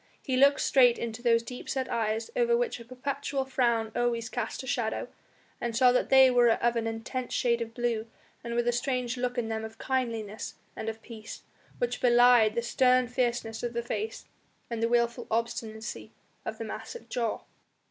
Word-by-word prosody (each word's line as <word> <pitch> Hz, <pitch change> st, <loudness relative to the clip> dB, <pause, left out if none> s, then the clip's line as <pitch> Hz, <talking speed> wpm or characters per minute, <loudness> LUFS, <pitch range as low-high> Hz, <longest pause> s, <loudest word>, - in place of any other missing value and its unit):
He 260 Hz, -, -1 dB
looked 280 Hz, +2 st, +5 dB
straight 245 Hz, -3 st, +5 dB
into 235 Hz, 0 st, -5 dB
those 230 Hz, -1 st, +3 dB
deep 250 Hz, +1 st, -8 dB
set 260 Hz, -1 st, -1 dB
eyes 225 Hz, -, -1 dB
over 475 Hz, -1 st, +3 dB
which 475 Hz, -, -1 dB
a 235 Hz, -, -11 dB
perpetual 270 Hz, +2 st, -3 dB
frown 235 Hz, -4 st, +1 dB
always 235 Hz, -1 st, 0 dB
cast 245 Hz, +1 st, -4 dB
a -, -, -8 dB
shadow, 235 Hz, -4 st, -2 dB, 0.5 s
and 235 Hz, -1 st, -2 dB
saw 250 Hz, 0 st, +6 dB
that 250 Hz, -, +1 dB
they 265 Hz, -1 st, +7 dB
were 245 Hz, -1 st, +5 dB
of 235 Hz, +1 st, +2 dB
an 230 Hz, -1 st, -1 dB
intense 225 Hz, +3 st, -4 dB
shade 235 Hz, -2 st, +1 dB
of 230 Hz, 0 st, -5 dB
blue 235 Hz, -2 st, -1 dB, 0.4 s
and 235 Hz, 0 st, -4 dB
with 240 Hz, 0 st, +1 dB
a -, -, +4 dB
strange 250 Hz, 0 st, -1 dB
look 250 Hz, 0 st, -2 dB
in 235 Hz, -2 st, 0 dB
them 220 Hz, 0 st, -3 dB
of 220 Hz, 0 st, -8 dB
kindliness 230 Hz, -6 st, -3 dB, 0.2 s
and 225 Hz, -, -3 dB
of 225 Hz, 0 st, -8 dB
peace, 220 Hz, -2 st, -9 dB, 0.3 s
which -, -, -2 dB
belied 240 Hz, -3 st, +6 dB
the 235 Hz, -, 0 dB
stern 250 Hz, +1 st, +3 dB
fierceness 240 Hz, -3 st, -1 dB
of 240 Hz, -1 st, -3 dB
the 235 Hz, 0 st, -2 dB
face 425 Hz, -, -4 dB, 0.5 s
and 230 Hz, -1 st, -2 dB
the 230 Hz, -, +2 dB
wilful 235 Hz, 0 st, +1 dB
obstinacy 225 Hz, -1 st, -3 dB, 0.3 s
of -, -, -4 dB
the -, -, -5 dB
massive 475 Hz, -, -7 dB
jaw. 230 Hz, -3 st, -2 dB
240 Hz, 190 wpm, -29 LUFS, 230-255 Hz, 0.5 s, they